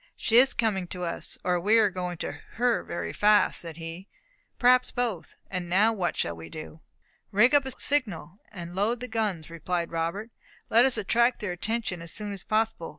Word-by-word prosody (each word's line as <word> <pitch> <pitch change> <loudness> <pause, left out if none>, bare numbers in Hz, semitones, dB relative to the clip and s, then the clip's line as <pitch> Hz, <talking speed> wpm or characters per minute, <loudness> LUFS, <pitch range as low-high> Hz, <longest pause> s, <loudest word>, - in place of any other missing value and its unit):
"She 230 - +2
is 265 +2 +6
coming 200 -6 0
to 180 0 -6
us, 170 - -3
or 180 -1 +1
we 210 +6 +4
are 210 -3 +4
going 180 -1 -4
to - - -3 0.2
her 240 0 +1
very 170 - -5
fast," 210 0 +3
said 165 -2 -7
he. 165 +3 -8 0.5
"Perhaps 250 0 +4
both; 225 -10 -3
and 180 -2 -4
now 210 +6 +4
what 180 -5 -2
shall 85 - -1
we 80 0 -10
do?" 155 0 -9 0.5
"Rig 220 +7 +4
up 285 -2 +4
a - - -3
signal, 205 - -2
and 175 -4 -8
load 210 +6 0
the 250 - -5
guns," 210 -9 -2
replied 170 +1 -3
Robert. 170 +7 -3 0.4
"Let 235 +3 +6
us 265 - +1
attract 235 +5 +2
their 205 -4 -3
attention 200 0 -3
as 170 -1 -6
soon 210 -1 -3
as 195 -2 -5
possible. 220 -6 -1
200 Hz, 195 wpm, -27 LUFS, 175-230 Hz, 0.5 s, is